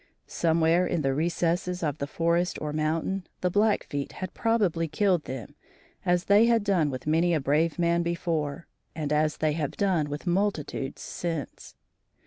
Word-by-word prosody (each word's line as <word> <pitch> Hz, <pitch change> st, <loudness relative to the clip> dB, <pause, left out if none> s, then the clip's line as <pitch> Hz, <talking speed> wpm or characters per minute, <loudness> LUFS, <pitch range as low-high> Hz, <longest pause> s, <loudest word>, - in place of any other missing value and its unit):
Somewhere 165 Hz, +2 st, +2 dB
in 165 Hz, -3 st, -1 dB
the 135 Hz, 0 st, +1 dB
recesses 175 Hz, +3 st, 0 dB
of 150 Hz, -1 st, -1 dB
the 140 Hz, -, -2 dB
forest 170 Hz, +3 st, 0 dB
or 150 Hz, -1 st, -4 dB
mountain, 160 Hz, +5 st, -1 dB
the 180 Hz, -, +1 dB
Blackfeet 205 Hz, -9 st, 0 dB
had 185 Hz, -1 st, -6 dB
probably 200 Hz, -8 st, +1 dB
killed 180 Hz, +1 st, +1 dB
them 130 Hz, -4 st, -7 dB, 0.5 s
as 175 Hz, -1 st, +2 dB
they 205 Hz, +3 st, +5 dB
had 230 Hz, -2 st, +3 dB
done 185 Hz, -7 st, +2 dB
with 130 Hz, -2 st, -6 dB
many 165 Hz, +3 st, +2 dB
a -, -, +1 dB
brave 150 Hz, +4 st, +1 dB
man 170 Hz, 0 st, +2 dB
before, 170 Hz, -3 st, -2 dB, 0.3 s
and 150 Hz, -2 st, -2 dB
as 155 Hz, 0 st, +1 dB
they 155 Hz, -1 st, +1 dB
have 150 Hz, -1 st, -3 dB
done 180 Hz, -7 st, +1 dB
with 145 Hz, +4 st, -5 dB
multitudes 175 Hz, -7 st, -1 dB
since. 165 Hz, -6 st, -5 dB
165 Hz, 160 wpm, -27 LUFS, 150-180 Hz, 0.5 s, they